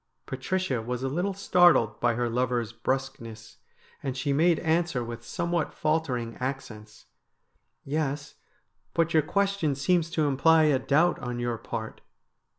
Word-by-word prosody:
Patricia 135 0 -2
was 125 +2 -4
a - - 0
little 180 +7 -1
startled 175 - +4
by 120 -1 +2
her 120 +1 0
lover's 120 -1 -1
brusqueness, 115 -2 -4 0.4
and 135 -2 -4
she 140 +2 0
made 165 +3 +3
answer 165 -5 +1
with 115 0 -7
somewhat 170 +2 -2
faltering 130 -7 -1
accents: 110 -5 -6 0.4
' - - -47
Yes, 145 0 -2 0.6
but 165 0 +1
your 160 - +5
question 200 -4 0
seems 165 +4 +1
to 160 -2 0
imply 160 +4 +4
a 145 -4 +3
doubt 160 +7 +2
on 125 0 -4
your 120 -1 -2
part.' 110 -2 -6
135 Hz, 145 wpm, -27 LUFS, 120-165 Hz, 0.6 s, your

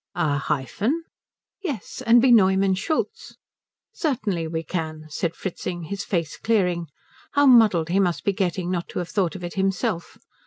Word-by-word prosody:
"A 145 -2 +1
hyphen?" 200 - -1 0.6
"Yes, 290 - -5
and 235 +1 +5
be 260 - +5
Neumann 190 -3 +5
Schultz?" 260 - -3 0.6
"Certainly 210 - -1
we 160 0 -3
can," 155 -2 -4
said 165 +2 -2
Fritzing, 175 -2 -5
his 200 +5 -4
face 170 -5 -2
clearing; 180 -7 +1 0.5
how 285 0 +4
muddled 215 - +5
he 190 +3 +2
must 175 -3 +1
be 200 - +1
getting 185 -1 -1
not 175 -2 -2
to - - -7
have 175 -1 -3
thought 190 -4 0
of 185 - -8
it 175 - -5
himself! 195 -1 -1
185 Hz, 160 wpm, -24 LUFS, 170-215 Hz, 0.6 s, and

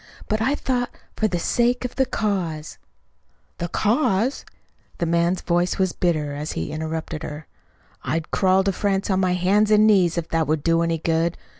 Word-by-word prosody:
"But 215 +1 -1
I 270 +6 +2
thought, 250 -3 -1 0.3
for 215 - +1
the 180 - -1
sake 240 +7 +1
of 250 - -5
the 265 0 +1
cause 180 -10 -2 0.4
" - - -42
"The 175 - -2
cause!" 220 - +1 0.5
The 170 - -1
man's 170 +2 +1
voice 175 +1 0
was 190 -2 +1
bitter 155 -5 0
as 150 +2 -4
he 80 - -4
interrupted 160 0 -4
her. 150 -1 -7 0.6
"I'd 165 0 -3
crawl 190 0 +3
to 195 - +1
France 195 +1 -1
on 190 - +2
my 185 -1 +2
hands 200 +4 +2
and 215 0 +5
knees 185 -6 +4
if 165 -1 -2
that 165 -1 0
would 155 -1 0
do 165 0 +3
any 165 -1 0
good! 165 +1 0
180 Hz, 185 wpm, -23 LUFS, 165-210 Hz, 0.6 s, and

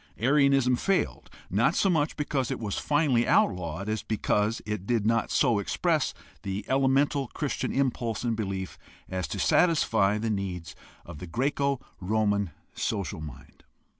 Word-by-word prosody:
Arianism 135 -1 +3
failed 195 +8 -1 0.2
not - - +2
so - - +3
much 155 -5 +1
because 145 -4 -1
it - - -3
was 105 -3 -3
finally 145 -6 +2
outlawed 90 +1 +1
as 110 -1 -1
because 110 0 0
it 105 -2 -4
did 115 -4 +1
not 115 +1 +2
so 115 -4 +3
express 100 - 0 0.3
the 100 +1 -4
elemental 135 +1 +2
Christian 145 +2 -3
impulse 125 -5 -1
and 115 -2 0
belief 95 -3 -4 0.3
as 95 -3 -3
to - - -5
satisfy 110 - +3
the 110 +1 -1
needs 95 -5 -4 0.3
of 85 -4 -9
the 90 - -7
Greco 140 - 0 0.2
Roman 100 0 +1 0.2
social 100 -7 -3
mind. 75 -5 -11
110 Hz, 145 wpm, -27 LUFS, 100-135 Hz, 0.3 s, Arianism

